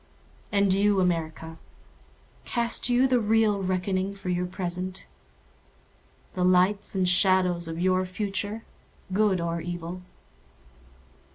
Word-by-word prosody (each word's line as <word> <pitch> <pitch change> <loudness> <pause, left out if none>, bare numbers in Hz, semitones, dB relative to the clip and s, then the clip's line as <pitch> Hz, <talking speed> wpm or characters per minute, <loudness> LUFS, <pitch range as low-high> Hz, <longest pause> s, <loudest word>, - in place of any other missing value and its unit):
And 200 -2 +3
you, 200 0 +2
America, 165 -2 -2 0.8
Cast 235 0 +1
you 245 +2 +4
the 255 -1 +2
real 215 -2 +2
reckoning 185 +1 -1
for 195 -2 -7
your 180 0 -1
present? 185 0 -3 1.3
The 180 - -1
lights 185 +3 +2
and 185 -1 +1
shadows 180 -2 +2
of 165 0 -5
your 185 +1 +2
future—good 205 0 -3
or 170 0 -2
evil? 175 +1 -6
185 Hz, 105 wpm, -26 LUFS, 180-205 Hz, 1.3 s, you